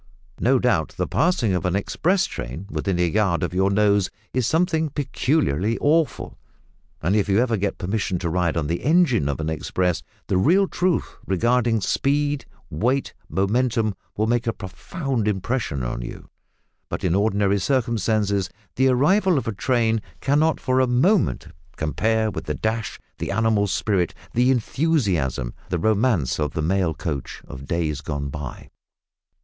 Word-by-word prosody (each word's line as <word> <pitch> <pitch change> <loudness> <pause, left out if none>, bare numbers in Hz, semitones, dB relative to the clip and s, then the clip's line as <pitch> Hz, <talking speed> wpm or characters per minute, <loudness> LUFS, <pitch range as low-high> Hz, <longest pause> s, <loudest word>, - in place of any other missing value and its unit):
No 130 +3 +3
doubt 120 -11 +1
the - - 0
passing 160 - +1
of 90 -3 -1
an 90 0 0
express 180 - +1
train 65 +10 -6
within 95 -3 -1
a 90 - +3
yard 95 -1 +1
of 85 - -2
your 95 +1 +2
nose 100 -1 +3 0.2
is 125 -3 +1
something 160 -1 +1
peculiarly 130 - 0
awful, 155 +1 0 0.6
and 90 +6 +2
if 105 -1 +1
you 100 - +3
ever 120 0 +2
get 100 -1 -2
permission 95 0 -1
to 85 -1 -2
ride 85 -1 0
on 80 - 0
the 85 +3 -2
engine 145 - +3
of 70 - -2
an 80 - -2
express, 80 +2 -1 0.2
the 95 - 0
real 180 - +4
truth 180 -3 -1
regarding 115 +3 +2
speed, 145 +4 0 0.3
weight, 125 - 0 0.2
momentum, 110 +2 +1 0.2
will 110 - +2
make 120 +1 0
a 115 - +1
profound 120 - -4
impression 100 - -1
on - - -3
you, - - -9 0.6
but - - -4
in 90 - +2
ordinary 100 0 +2
circumstances 110 -5 0 0.3
the 130 +1 +4
arrival 165 +8 +3
of 130 - -2
a - - 0
train 115 0 +1 0.2
cannot 150 +3 +2
for 130 0 +1
a 130 - +3
moment 150 - +2 0.3
compare 110 +8 0
with - - -6
the - - -2
dash, 110 -1 -2 0.2
the - - -3
animal 110 0 +2
spirit, 95 -2 0 0.2
the 125 +2 +3
enthusiasm, 105 - 0 0.2
the 90 - 0
romance 105 - +1
of 75 -2 -1
the 80 - -2
mail 90 0 +1
coach 75 -6 -5
of 65 +1 -9
days 80 -4 -1
gone 70 -2 -3
by. 70 -2 -7
110 Hz, 160 wpm, -23 LUFS, 90-130 Hz, 0.6 s, real